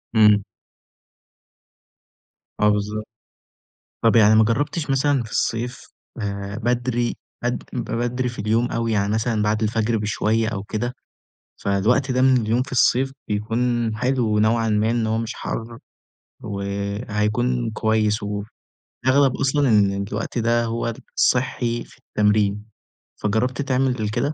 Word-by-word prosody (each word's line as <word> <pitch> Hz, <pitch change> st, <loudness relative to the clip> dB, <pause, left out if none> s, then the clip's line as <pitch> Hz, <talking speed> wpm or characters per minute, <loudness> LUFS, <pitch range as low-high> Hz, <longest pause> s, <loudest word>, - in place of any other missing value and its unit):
إمم. 105 Hz, -2 st, +6 dB, 2.2 s
آه 105 Hz, -, +4 dB
بالضبط. 105 Hz, +1 st, -1 dB, 1.0 s
طَب 115 Hz, 0 st, +4 dB
يعني 110 Hz, -1 st, +6 dB
ما 110 Hz, -, +6 dB
جرّبتش 145 Hz, +8 st, -1 dB
مثلًا 135 Hz, -1 st, +2 dB
في 110 Hz, -, -11 dB
الصيف 120 Hz, +3 st, -1 dB, 0.4 s
آآ 100 Hz, 0 st, -4 dB
بدري 120 Hz, 0 st, 0 dB, 0.3 s
بد 120 Hz, 0 st, -1 dB
ب 120 Hz, -2 st, -4 dB
بدري 120 Hz, +2 st, -1 dB
في 120 Hz, -, -9 dB
اليوم 110 Hz, +4 st, +1 dB
أوي 115 Hz, 0 st, -1 dB
يعني 100 Hz, -1 st, +1 dB
مثلًا 110 Hz, 0 st, 0 dB
بَعد 105 Hz, +1 st, +1 dB
الفجر 110 Hz, +1 st, +1 dB
بشوية 105 Hz, +2 st, 0 dB
أو 105 Hz, -3 st, -3 dB
كده؟ 115 Hz, +3 st, -3 dB, 0.7 s
فالوقت 115 Hz, +8 st, +2 dB
ده 130 Hz, 0 st, +1 dB
من 130 Hz, 0 st, +5 dB
اليوم 115 Hz, +3 st, +1 dB
في 140 Hz, -, -13 dB
الصيف 130 Hz, +1 st, +3 dB, 0.2 s
بيكون 115 Hz, +2 st, 0 dB
حلو 125 Hz, -3 st, +1 dB
نوعًا 115 Hz, +1 st, +2 dB
ما 105 Hz, +1 st, +2 dB
إن 115 Hz, -2 st, 0 dB
هو 110 Hz, 0 st, 0 dB
مش 115 Hz, 0 st, -3 dB
حَر 115 Hz, +1 st, -5 dB, 0.7 s
وهيكون 105 Hz, +4 st, -1 dB
كويس 110 Hz, -1 st, +1 dB
وف 105 Hz, 0 st, -4 dB, 0.6 s
أغلب 135 Hz, 0 st, +4 dB
أصلًا 140 Hz, 0 st, +2 dB
إن 100 Hz, -2 st, +3 dB
الوقت 115 Hz, +3 st, -3 dB
ده 115 Hz, 0 st, +2 dB
هو 115 Hz, 0 st, -2 dB, 0.2 s
الصحي 120 Hz, -2 st, +1 dB
في -, -, -19 dB
التمرين، 105 Hz, 0 st, +1 dB, 0.6 s
فجرّبت 115 Hz, +5 st, 0 dB
تعمل 130 Hz, -5 st, 0 dB
كده؟ 120 Hz, +7 st, -1 dB
115 Hz, 135 wpm, -22 LUFS, 105-125 Hz, 2.2 s, إمم